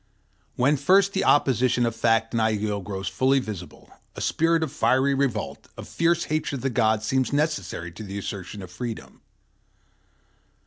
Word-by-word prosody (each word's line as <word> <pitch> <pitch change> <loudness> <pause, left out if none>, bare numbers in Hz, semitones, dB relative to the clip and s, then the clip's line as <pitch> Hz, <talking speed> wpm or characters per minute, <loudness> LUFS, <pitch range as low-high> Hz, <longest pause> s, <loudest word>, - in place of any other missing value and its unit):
When 140 +4 +2
first 190 +7 +4
the 190 - 0
opposition 125 -3 +3
of 115 -1 -2
fact 115 0 +1
and 115 - +1
ideal 105 -2 0
grows 95 0 -5
fully 135 +1 +2
visible, 105 -9 -6 0.2
a - - -7
spirit 165 0 +2
of 155 - -3
fiery 130 +2 +2
revolt, 135 -6 -2
of - - -8
fierce 170 0 +1
hatred 155 -2 -2
of 125 - -9
the 135 - 0
gods, 110 -2 +1
seems 130 +2 0
necessary 145 - -2
to 85 - -11
the 100 -1 -6
assertion 100 0 -6
of 90 - -10
freedom. 110 - -7
120 Hz, 165 wpm, -25 LUFS, 105-140 Hz, 0.2 s, first